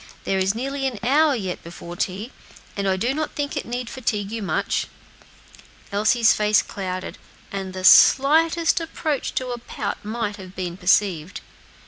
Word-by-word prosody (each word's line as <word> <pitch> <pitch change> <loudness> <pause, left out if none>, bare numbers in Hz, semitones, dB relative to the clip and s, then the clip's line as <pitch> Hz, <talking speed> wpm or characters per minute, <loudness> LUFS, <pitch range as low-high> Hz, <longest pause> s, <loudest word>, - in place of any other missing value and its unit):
There 195 - 0
is 190 +2 +1
nearly 270 +3 -2
an 250 -4 -4
hour 290 +3 +4
yet 190 -6 -4
before 170 0 -9
tea, 200 +7 -3 0.4
and 200 -1 -2
I 190 - +1
do 240 +7 0
not 310 +1 -3
think 290 +1 -3
it 285 - -4
need 245 0 -4
fatigue 215 -6 -3
you 225 0 -4
much." 195 - -1 1.0
Elsie's 220 +3 +4
face 210 -1 +3
clouded, 185 -1 -5 0.3
and 195 -1 -4
the 185 0 -6
slightest 325 - +6
approach 315 -3 -3
to 255 -1 -2
a 240 -1 -4
pout - - -5
might 215 0 -3
have 190 -1 -11
been 180 -2 -4
perceived. 185 -2 +1
215 Hz, 160 wpm, -23 LUFS, 190-265 Hz, 1.0 s, slightest